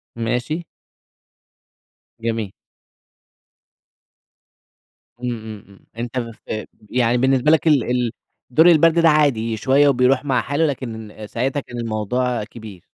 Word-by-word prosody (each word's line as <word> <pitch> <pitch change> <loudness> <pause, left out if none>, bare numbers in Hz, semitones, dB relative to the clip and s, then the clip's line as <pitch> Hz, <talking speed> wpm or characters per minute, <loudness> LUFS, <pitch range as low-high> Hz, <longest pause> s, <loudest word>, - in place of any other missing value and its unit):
ماشي. 125 +8 -2 1.6
جميل. 115 -3 -2 2.7
إمم، 125 0 -3
إمم، 110 -2 -9
إمم، 100 - -20
أنت 120 +2 -3
ف 115 -2 -6 0.2
يعني 125 -1 +2
بالنسبة 130 +3 +3
لك 160 +1 +3
ال 145 -6 +4
ال 125 -2 0 0.4
دور 155 +7 +4
البرد 165 0 +5
ده 165 -1 +5
عادي، 120 -7 +2
شوية 140 +5 +3
و 140 - +4
بيروح 125 +3 +2
مع 130 -3 +1
حاله، 145 +3 0
لكن 115 -6 -5
ساعتها 130 +6 -1
كان 125 -2 -9
الموضوع 115 +1 -1
كبير. 105 -5 -11
125 Hz, 120 wpm, -20 LUFS, 115-140 Hz, 2.7 s, البرد